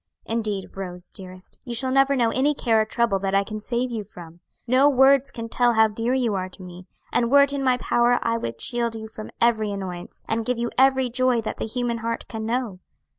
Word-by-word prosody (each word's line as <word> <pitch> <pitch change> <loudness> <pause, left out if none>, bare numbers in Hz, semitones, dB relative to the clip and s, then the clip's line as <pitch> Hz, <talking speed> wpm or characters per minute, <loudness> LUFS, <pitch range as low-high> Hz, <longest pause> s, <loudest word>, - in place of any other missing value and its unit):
Indeed, 215 -4 -3
Rose, 180 -2 -7
dearest, 185 -1 -10
you 240 -2 -5
shall 260 +2 0
never 270 +1 +3
know 235 -3 +2
any 285 +3 +1
care 225 -5 +2
or - - 0
trouble 225 -3 0
that 195 0 -1
I 200 - +3
can 215 +1 -6
save 245 +3 -2
you 220 -3 -3
from. 175 -4 -13 0.3
No 260 +4 +4
words 275 0 +4
can 230 -1 -6
tell 240 +1 +2
how 220 0 +5
dear 230 +4 -1
you 245 -5 0
are 185 -1 -2
to 185 +1 -12
me, 180 +1 -11 0.3
and 235 -1 +2
were 280 +2 +7
it 280 0 0
in 280 -1 -2
my 255 -1 +3
power 240 0 +2
I 230 - +1
would 115 - -5
shield 235 -1 -1
you 220 0 -7
from 215 0 -9
every 225 -2 +2
annoyance, 190 -3 -7
and 225 0 -1
give 250 +1 -1
you 235 0 -2
every 265 -1 +3
joy 255 -1 +2
that 215 - -5
the - - -3
human 240 0 -2
heart 230 0 -4
can 220 -1 -5
know. 235 -5 -2
230 Hz, 230 wpm, -23 LUFS, 205-250 Hz, 0.3 s, were